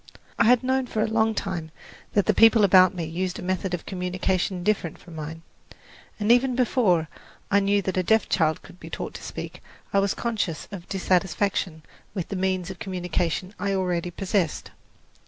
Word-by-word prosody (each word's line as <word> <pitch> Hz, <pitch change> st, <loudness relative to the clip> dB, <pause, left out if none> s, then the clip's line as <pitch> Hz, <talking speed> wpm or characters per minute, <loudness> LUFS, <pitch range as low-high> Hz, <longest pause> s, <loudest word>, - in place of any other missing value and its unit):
I 230 Hz, -, +5 dB
had 245 Hz, +2 st, +5 dB
known 260 Hz, 0 st, +1 dB
for 215 Hz, -2 st, 0 dB
a -, -, 0 dB
long 220 Hz, 0 st, +1 dB
time 175 Hz, -6 st, -3 dB, 0.4 s
that 205 Hz, -, +3 dB
the 215 Hz, -, +3 dB
people 225 Hz, +1 st, +6 dB
about 185 Hz, -1 st, +6 dB
me 175 Hz, -, -3 dB
used 180 Hz, +3 st, -3 dB
a -, -, -7 dB
method 185 Hz, 0 st, -1 dB
of 170 Hz, -, -9 dB
communication 180 Hz, 0 st, -1 dB
different 190 Hz, -5 st, 0 dB
from 175 Hz, -, -14 dB
mine; 160 Hz, +1 st, -7 dB, 0.8 s
and 210 Hz, +2 st, +2 dB
even 250 Hz, +1 st, +4 dB
before 215 Hz, -10 st, +2 dB, 0.4 s
I 200 Hz, -, +5 dB
knew 200 Hz, 0 st, +2 dB
that 190 Hz, 0 st, -2 dB
a -, -, +4 dB
deaf 220 Hz, +4 st, +2 dB
child 160 Hz, -3 st, +1 dB
could 180 Hz, -, -15 dB
be -, -, -10 dB
taught -, -, -5 dB
to -, -, -9 dB
speak, -, -, -7 dB, 0.3 s
I 200 Hz, -, +5 dB
was 195 Hz, 0 st, +1 dB
conscious 215 Hz, -9 st, -2 dB
of 185 Hz, -4 st, -8 dB
dissatisfaction 185 Hz, -3 st, 0 dB, 0.3 s
with 185 Hz, -4 st, -3 dB
the -, -, -3 dB
means 185 Hz, -1 st, -1 dB
of 190 Hz, -, -10 dB
communication 180 Hz, 0 st, -2 dB
I 200 Hz, -1 st, 0 dB
already 180 Hz, -2 st, -1 dB
possessed. 185 Hz, -2 st, -1 dB
190 Hz, 185 wpm, -25 LUFS, 175-210 Hz, 0.8 s, people